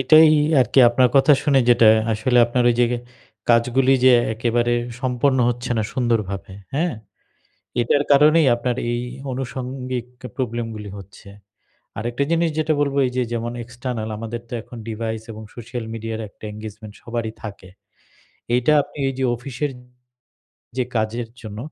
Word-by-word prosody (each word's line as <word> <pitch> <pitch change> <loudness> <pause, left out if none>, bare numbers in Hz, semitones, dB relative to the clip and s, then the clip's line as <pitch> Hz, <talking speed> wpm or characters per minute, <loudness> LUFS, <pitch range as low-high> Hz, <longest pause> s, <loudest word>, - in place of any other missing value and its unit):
এটাই 155 +5 +7 0.3
আরকি 125 +2 +2
আপনার 125 +1 +3
কথা 140 +2 +6
শুনে, 140 -2 +3
যেটা 115 -2 +6 0.2
আসলে 120 +4 +1
আপনার 120 +1 0
ওই - - +1
যে 120 - +5 0.6
কাজগুলি 125 +3 +4
যে 130 - +8 0.2
একেবারে 120 +1 +1 0.3
সম্পন্ন 130 +1 +1
হচ্ছে 120 +1 -3
না 110 - +1
সুন্দরভাবে, 105 -7 -1 0.2
হ্যাঁ? 165 0 0 0.9
এটার 120 +4 +2
কারণেই 150 +2 +6
আপনার 120 0 -2
এই 120 0 -1 0.3
আনুষঙ্গিক 125 0 -4 0.3
প্রবলেমগুলি 115 -4 -4
হচ্ছে। 100 +1 -14 0.7
আরেকটা 120 +5 -1
জিনিস 170 0 +2
যেটা 155 0 +1
বলব, 140 -1 0
এই - - -4
যে 125 - +2
যেমন 115 0 -2
এক্সটার্নাল 120 -2 -5
আমাদের 115 +1 -5
তো - - -8
এখন 120 - -12
ডিভাইস, 110 0 -3
এবং 110 0 -9
সোশ্যাল 120 0 -6
মিডিয়ার 115 0 -5
একটা - - -29
এনগেজমেন্ট 105 0 -9
সবারই 115 -2 -4
থাকে। 100 -3 -8 0.9
এইটা 125 +5 +3
আপনি 145 +1 -14
এই 135 - -3
যে 130 - 0
অফিসের 135 +3 -4 1.1
যে 125 - +1
কাজের 110 +2 -1
জন্য 105 -1 -8
120 Hz, 145 wpm, -21 LUFS, 115-130 Hz, 1.1 s, যে